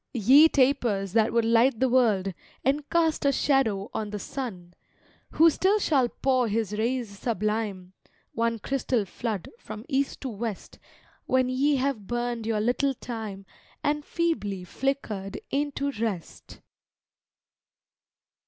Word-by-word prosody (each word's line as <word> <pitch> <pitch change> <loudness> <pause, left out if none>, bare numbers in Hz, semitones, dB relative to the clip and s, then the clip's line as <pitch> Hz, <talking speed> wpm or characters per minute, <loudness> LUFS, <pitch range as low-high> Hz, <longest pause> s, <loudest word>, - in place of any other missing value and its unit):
Ye 260 +8 +7
tapers, 245 - +1
that 225 -1 +3
would 230 0 +2
light 230 +1 +3
the 260 - +3
world, 215 -7 +2 0.3
And 285 +2 0
cast 325 -2 +2
a 280 - +4
shadow 240 -9 +1
on 215 -1 -3
the 210 - -4
Sun 190 -6 -6 0.6
Who 330 +1 +6
still 385 +6 +2
shall 275 - +2
pour 255 -2 +1
His 215 -1 -1
rays 225 -2 -2
sublime, 210 -4 -2 0.4
One 230 0 0
crystal 250 -1 -1
flood, 210 0 -4
from 215 +2 -9
East 275 -2 -1
to 265 - -3
West, 220 -2 -6 0.5
When 255 -1 +2
ye 280 +3 +2
have 260 -7 -1
burned 240 -2 -2
your 220 -2 0
little 260 +4 +1
time 220 -6 -6 0.4
And 295 0 0
feebly 210 - -2
flickered 210 -3 -3
into 280 0 -1
rest! 215 -8 -5
235 Hz, 130 wpm, -26 LUFS, 210-275 Hz, 0.6 s, Ye